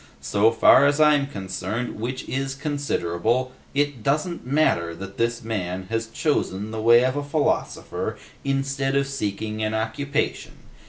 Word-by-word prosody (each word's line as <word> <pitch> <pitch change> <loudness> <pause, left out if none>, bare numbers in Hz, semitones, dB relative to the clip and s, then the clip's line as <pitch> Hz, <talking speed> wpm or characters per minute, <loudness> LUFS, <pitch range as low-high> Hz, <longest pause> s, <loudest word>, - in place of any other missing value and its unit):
So 100 +11 +3
far 130 +4 +6
as 145 +1 +1
I'm 150 -2 +5
concerned, 100 +1 -4
which 125 +4 -4
is 135 0 -2
considerable, 130 - -1 0.2
it 145 -4 0
doesn't 150 - -1
matter 85 - +2
that 95 +2 -9
this 115 0 0
man 95 -4 -3
has 115 0 -1
chosen 110 - -1
the 110 0 -4
way 120 +2 +6
of 130 +1 0
a 145 - -1
philosopher 145 +1 -1 0.3
instead 135 0 0
of 140 0 +3
seeking 110 -5 -3
an 110 0 0
occupation. 140 +7 -2
125 Hz, 145 wpm, -24 LUFS, 110-140 Hz, 0.3 s, far